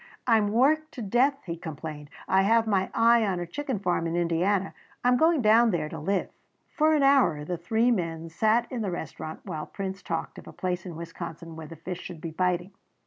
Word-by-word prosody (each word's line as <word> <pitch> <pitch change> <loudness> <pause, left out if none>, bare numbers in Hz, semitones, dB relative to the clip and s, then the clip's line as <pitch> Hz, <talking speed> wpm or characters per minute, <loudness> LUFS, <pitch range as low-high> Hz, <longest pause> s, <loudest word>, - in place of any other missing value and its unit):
"I 230 -3 +5
am 210 -1 +2
worked 310 +7 +2
to 245 - -6
death," 260 +7 +2
he 170 -2 -4
complained; 155 -2 -7 0.2
"I 190 +1 +4
have 225 +3 +3
my 195 -3 +1
eye 230 0 +4
on 190 -4 0
a 175 - -3
chicken 265 - -3
farm 180 -3 0
in 165 - -2
Indiana. 175 +3 +1 0.3
I 245 - +4
am 250 - +5
going 320 0 +3
down 225 +2 +6
there 160 -6 -1
to 160 - -6
live." 190 +5 -1 0.4
For 310 -1 +3
an 290 - +2
hour 260 - +4
the 180 - -2
three 220 +8 +1
men 165 -6 -2
sat 220 +8 +2
in 245 -3 -3
the 205 - -1
restaurant 160 -2 -6
while 160 -6 -5
Prince 195 -1 -5
talked 165 -2 -4
of - - -14
a - - -10
place 180 0 -3
in 170 - -7
Wisconsin 165 0 -7
where 160 -1 -8
the 165 - -10
fish 175 +3 -6
should 170 - -8
be 165 +1 -6
biting. 180 +2 0
190 Hz, 220 wpm, -27 LUFS, 165-230 Hz, 0.4 s, down